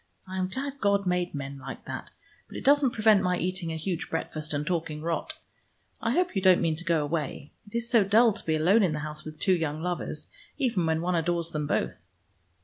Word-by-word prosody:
I 190 Hz, 0 st, -4 dB
am 185 Hz, -, +1 dB
glad 275 Hz, +7 st, -5 dB
God 200 Hz, -1 st, +2 dB
made 180 Hz, -2 st, 0 dB
men 140 Hz, 0 st, -5 dB
like 135 Hz, 0 st, -8 dB
that, -, -, -6 dB, 0.4 s
but -, -, -8 dB
it -, -, -6 dB
doesn't 285 Hz, -1 st, +5 dB
prevent 215 Hz, -3 st, +4 dB
my 180 Hz, 0 st, +1 dB
eating 180 Hz, -2 st, -2 dB
a -, -, -3 dB
huge 170 Hz, +2 st, -3 dB
breakfast 155 Hz, -1 st, -3 dB
and 145 Hz, 0 st, -1 dB
talking 160 Hz, -3 st, -2 dB
rot. 170 Hz, -, -2 dB, 0.7 s
I 230 Hz, -, 0 dB
hope 360 Hz, -3 st, +1 dB
you 195 Hz, -, +1 dB
don't 185 Hz, -2 st, +6 dB
mean 165 Hz, -2 st, +1 dB
to 175 Hz, -, -4 dB
go 170 Hz, -3 st, +2 dB
away. 150 Hz, -1 st, -3 dB, 0.2 s
It 205 Hz, -, -10 dB
is 235 Hz, 0 st, -1 dB
so 230 Hz, -3 st, +5 dB
dull 220 Hz, +3 st, +5 dB
to -, -, -7 dB
be 160 Hz, -, +1 dB
alone 180 Hz, +9 st, +4 dB
in 180 Hz, -6 st, +2 dB
the 150 Hz, -, -2 dB
house 155 Hz, 0 st, -6 dB
with 155 Hz, 0 st, -9 dB
two 190 Hz, -, +3 dB
young 160 Hz, -3 st, -1 dB
lovers, 180 Hz, -1 st, -3 dB, 0.3 s
even 230 Hz, -, +1 dB
when 160 Hz, 0 st, +1 dB
one 180 Hz, +1 st, 0 dB
adores 170 Hz, 0 st, 0 dB
them 150 Hz, -2 st, -2 dB
both." -, -, -2 dB
175 Hz, 230 wpm, -28 LUFS, 155-200 Hz, 0.7 s, don't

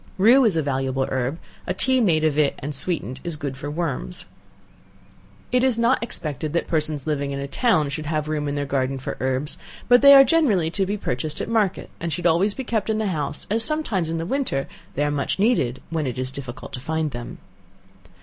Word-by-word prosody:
Rue 235 Hz, +8 st, +6 dB
is 200 Hz, -7 st, +3 dB
a 160 Hz, -, +1 dB
valuable 135 Hz, -1 st, -1 dB
herb, 130 Hz, +3 st, -1 dB, 0.3 s
a 185 Hz, -, -1 dB
tea 260 Hz, +4 st, +2 dB
made 165 Hz, -8 st, +3 dB
of 155 Hz, -2 st, +2 dB
it 150 Hz, -2 st, +2 dB
and 145 Hz, +2 st, -5 dB
sweetened 135 Hz, -3 st, -2 dB
is 170 Hz, -2 st, -3 dB
good 140 Hz, -2 st, -4 dB
for 140 Hz, +2 st, -6 dB
worms. 165 Hz, +2 st, -2 dB, 1.3 s
It 250 Hz, 0 st, +3 dB
is 260 Hz, -3 st, +3 dB
not 235 Hz, +2 st, +3 dB
expected 155 Hz, -, -3 dB
that 170 Hz, -, 0 dB
persons 155 Hz, -3 st, -1 dB
living 145 Hz, -2 st, -1 dB
in 140 Hz, 0 st, -3 dB
a 140 Hz, -, -4 dB
town 155 Hz, -, +2 dB
should 150 Hz, +2 st, -5 dB
have 155 Hz, -1 st, -1 dB
room 150 Hz, -1 st, -2 dB
in 145 Hz, -, -2 dB
their 145 Hz, 0 st, -1 dB
garden 135 Hz, -1 st, -1 dB
for 130 Hz, -, -5 dB
herbs, 130 Hz, +3 st, -1 dB, 0.3 s
but 245 Hz, 0 st, +6 dB
they 280 Hz, 0 st, +10 dB
are 270 Hz, -, +10 dB
generally 235 Hz, -, +2 dB
to 195 Hz, +1 st, -1 dB
be 205 Hz, +2 st, -1 dB
purchased 150 Hz, -3 st, -3 dB
at -, -, -3 dB
market, 215 Hz, -5 st, 0 dB
and 170 Hz, 0 st, -3 dB
should 175 Hz, +2 st, -3 dB
always 175 Hz, +5 st, +3 dB
be 265 Hz, -, -4 dB
kept 225 Hz, -3 st, -1 dB
in 220 Hz, -, +1 dB
the 215 Hz, -2 st, 0 dB
house, 150 Hz, -1 st, -3 dB
as 225 Hz, +1 st, +3 dB
sometimes 225 Hz, -, 0 dB
in 165 Hz, -, -2 dB
the 165 Hz, -, -3 dB
winter 225 Hz, -, -1 dB, 0.3 s
they 145 Hz, -, +1 dB
are 145 Hz, -, +1 dB
much 140 Hz, -2 st, -1 dB
needed 190 Hz, -, +1 dB
when 160 Hz, -4 st, -1 dB
it 125 Hz, -, -4 dB
is 130 Hz, 0 st, -3 dB
difficult 130 Hz, -2 st, -8 dB
to -, -, -4 dB
find 160 Hz, +2 st, -2 dB
them. 120 Hz, -1 st, -7 dB
155 Hz, 220 wpm, -23 LUFS, 140-210 Hz, 1.3 s, they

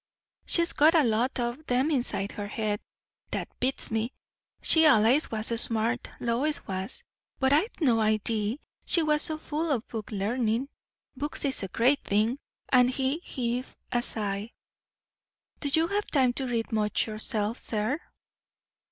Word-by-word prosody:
"She's 340 Hz, 0 st, +3 dB
got 315 Hz, +3 st, +5 dB
a 320 Hz, -, +6 dB
lot 240 Hz, +3 st, +1 dB
o' 240 Hz, 0 st, -1 dB
'em 255 Hz, +5 st, +2 dB
inside 240 Hz, -7 st, -1 dB
her 205 Hz, -1 st, -5 dB
head. 210 Hz, -1 st, -2 dB, 0.5 s
That -, -, -3 dB
beats 260 Hz, -1 st, 0 dB
me! 225 Hz, +3 st, -1 dB, 0.5 s
She 320 Hz, -, +5 dB
allays 260 Hz, +1 st, +5 dB
was 220 Hz, -1 st, -1 dB
smart, 230 Hz, +2 st, -1 dB
Lois 250 Hz, +6 st, 0 dB
was; 190 Hz, -, -3 dB, 0.3 s
but 265 Hz, +1 st, +2 dB
I'd 350 Hz, +11 st, +1 dB
no 250 Hz, -9 st, +3 dB
idee 215 Hz, +3 st, +1 dB, 0.2 s
she 335 Hz, -, +3 dB
was 300 Hz, -1 st, +2 dB
so 315 Hz, -2 st, -1 dB
full 310 Hz, +1 st, -2 dB
o' 265 Hz, -, +2 dB
book 220 Hz, -2 st, -7 dB
larnin'. 225 Hz, +5 st, 0 dB, 0.5 s
Books 290 Hz, +2 st, -3 dB
is 275 Hz, -, +1 dB
a 195 Hz, -, -3 dB
great 250 Hz, +9 st, +2 dB
thing!" 220 Hz, +6 st, +1 dB, 0.3 s
And 250 Hz, -1 st, +5 dB
he 265 Hz, +4 st, 0 dB
heaved 250 Hz, -6 st, -3 dB, 0.2 s
a 240 Hz, -, +2 dB
sigh. 210 Hz, -1 st, -2 dB, 1.1 s
"Do 285 Hz, -, -1 dB
you 320 Hz, +3 st, +3 dB
have 410 Hz, +1 st, -1 dB
time 260 Hz, -4 st, +3 dB
to 265 Hz, +1 st, -2 dB
read 230 Hz, -2 st, -2 dB
much 210 Hz, -1 st, +1 dB
yourself, 215 Hz, 0 st, -2 dB
sir?" 220 Hz, +7 st, -1 dB
245 Hz, 150 wpm, -28 LUFS, 220-285 Hz, 1.1 s, a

